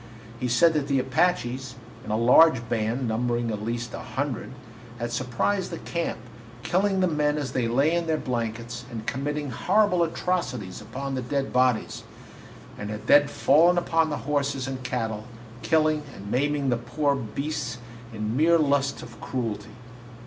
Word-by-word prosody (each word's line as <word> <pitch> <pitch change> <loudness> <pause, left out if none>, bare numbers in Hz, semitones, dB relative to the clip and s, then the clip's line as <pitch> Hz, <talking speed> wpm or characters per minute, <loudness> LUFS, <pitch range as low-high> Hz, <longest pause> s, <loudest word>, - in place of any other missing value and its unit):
He 125 - -1
said 160 +8 +4
that 150 -3 0
the 140 -2 +2
Apaches, 130 -2 0 0.3
in - - -9
a 110 - +1
large 125 +1 +5
band, 115 +2 -1
numbering 120 +1 0
at 105 -1 -4
least 120 +1 -3
a - - -5
hundred, 135 -3 -4 0.5
had 120 0 -3
surprised 130 +11 -1
the - - -5
camp, 170 -1 -3 0.5
killing 190 +6 +1
the 185 - +4
men 150 -2 +1
as 145 -3 -3
they 125 -3 0
lay 135 +7 +2
in 170 -1 0
their 160 -1 +1
blankets 120 -2 -3
and 110 -2 -6
committing 145 +2 -2
horrible 195 +1 +2
atrocities 160 - -2
upon 135 +6 -5
the 130 - -1
dead 135 +2 -2
bodies, 125 -3 +1 0.8
and 105 - -5
had 105 0 -6
then 145 0 +6
fallen 165 +6 +4
upon 165 -2 +2
the 150 - -2
horses 140 -2 -1
and 130 -1 -4
cattle, 110 -4 -3 0.4
killing 155 -1 +2
and 100 +1 -8
maiming 140 +1 +1
the 120 - +2
poor 140 +5 0
beasts 135 +1 -3 0.3
in 110 0 -3
mere 165 +4 +5
lust 140 -3 +1
of 120 -1 -12
cruelty. 115 -5 -4
130 Hz, 165 wpm, -26 LUFS, 120-150 Hz, 0.8 s, then